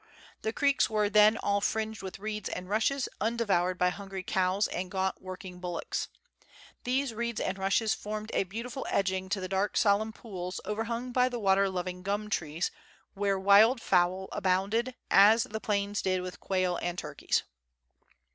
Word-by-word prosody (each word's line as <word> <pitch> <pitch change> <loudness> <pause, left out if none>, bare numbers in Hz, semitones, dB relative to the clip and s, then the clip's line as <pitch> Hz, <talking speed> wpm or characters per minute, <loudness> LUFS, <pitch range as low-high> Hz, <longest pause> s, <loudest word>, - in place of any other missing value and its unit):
The 220 - -1
creeks 280 +3 +2
were 210 -1 +1
then 210 +1 +6
all 200 0 0
fringed 220 +1 -1
with 190 -1 -7
reeds 210 +1 -4
and 180 - -5
rushes, 225 +7 +1
undevoured 200 -5 +1
by 180 0 +3
hungry 195 0 -6
cows 190 +2 +1
and 180 +1 -4
gaunt 190 0 -1
working 185 -1 -8
bullocks. 175 -1 -3 0.8
These 255 0 0
reeds 235 0 -2
and 195 - -2
rushes 200 +3 +2
formed 215 +1 -5
a - - +1
beautiful 235 +7 -6
edging 190 -1 0
to 200 - 0
the 185 - -4
dark 195 +2 0
solemn 215 +1 +3
pools 185 -5 -6
overhung 230 +3 -3
by 250 +1 +3
the 245 - -4
water 195 -1 +3
loving 180 -1 -4
gum 205 +3 -2
trees, 160 -1 -1 0.4
where 200 -1 0
wild 205 +6 +6
fowl 185 -1 +2
abounded, 200 +7 0 0.2
as 215 +3 +7
the 220 +1 -6
plains 200 -1 -1
did 185 -1 0
with 180 0 -7
quail 185 -2 0
and 175 0 -2
turkeys. - - -1
200 Hz, 165 wpm, -29 LUFS, 185-220 Hz, 0.8 s, as